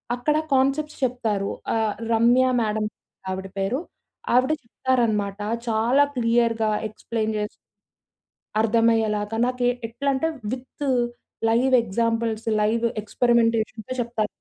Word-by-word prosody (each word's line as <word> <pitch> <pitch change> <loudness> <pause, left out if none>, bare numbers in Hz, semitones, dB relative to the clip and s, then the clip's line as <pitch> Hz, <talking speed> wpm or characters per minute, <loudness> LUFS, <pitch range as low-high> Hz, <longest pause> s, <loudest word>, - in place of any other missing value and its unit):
అక్కడ 300 +5 +1 0.2
కాన్సెప్ట్స్ 275 +3 +1
చెప్తారు 225 -6 0 0.2
ఆహ్, 220 -2 +1 0.2
రమ్య 240 +3 +5 0.2
మేడమ్ 215 -1 -1 0.4
ఆవిడ 190 +1 -4
పేరు. 195 +8 0 0.6
ఆవిడ 255 +4 +4
చెప్తారనమాట. 225 -5 0 0.3
చాలా 230 +5 +3
క్లియర్‌గా 230 -2 +2 0.2
ఎక్స్‌ప్లెయిన్ 220 0 -3
చేసి 210 - -1 1.1
అర్థమయ్యేలాగా 225 -1 +2
నాకు 250 0 -3
ఏ - - +3 0.2
ఎట్లా 240 +5 -2
అంటే 265 +4 0 0.2
విత్ 260 +3 -6 0.7
లైవ్ 250 +3 +2
ఎక్సాంపుల్స్, 230 +1 -1
లైవ్ 225 +2 +1 0.2
ఏక్స్పెరిమెంటేషన్‌తో 230 0 +1
‌చెప్తారు. 230 -2 -1
230 Hz, 105 wpm, -24 LUFS, 215-250 Hz, 1.1 s, రమ్య